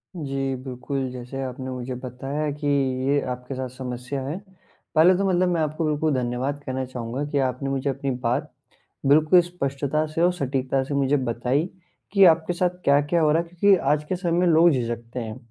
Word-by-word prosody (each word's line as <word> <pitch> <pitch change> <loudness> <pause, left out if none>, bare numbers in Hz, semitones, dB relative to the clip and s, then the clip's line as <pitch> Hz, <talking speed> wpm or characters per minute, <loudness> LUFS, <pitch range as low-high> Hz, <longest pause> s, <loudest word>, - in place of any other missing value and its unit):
जी, 135 -4 -2
बिल्कुल, 130 +1 -4
जैसे 125 +2 -6
आपने 130 0 -5
मुझे 125 0 -5
बताया 135 +4 -3
कि 145 +1 -4 0.4
ये 145 +1 +3
आपके 125 +2 -6
साथ 130 0 -4
समस्या 125 +1 -5
है। 150 +5 -3 0.6
पहले 170 +4 +6
तो 200 - 0
मतलब 180 0 +2
मैं 170 -2 +1
आपको 155 +1 -1
बिल्कुल 150 0 +1
धन्यवाद 130 +3 -1
कहना 130 0 -2
चाहूँगा 125 +1 -4
कि 145 - 0
आपने 130 +2 -4
मुझे 135 +1 -1
अपनी 135 0 -2
बात 125 +4 -1 0.6
बिल्कुल 155 +5 +6
स्पष्टता 150 -3 -2
से 165 - -2
और 175 +1 +4
सटीकता 135 -4 -1
से 140 - -4
मुझे 140 +1 +2
बताई, 125 +3 0 0.5
कि 200 -1 +6
आपके 165 0 +4
साथ 180 +1 +1 0.2
क्या-क्या 145 +4 +3
हो 155 -1 +4
रहा 165 +2 +3
है 170 - -14
क्योंकि 190 +3 +4
आज 150 0 +3
के 185 - 0
समय 175 -2 -2
में 180 - +3
लोग 170 0 +6
झिझकते 120 -2 -3
हैं, 110 -1 -5
140 Hz, 190 wpm, -24 LUFS, 130-155 Hz, 0.6 s, पहले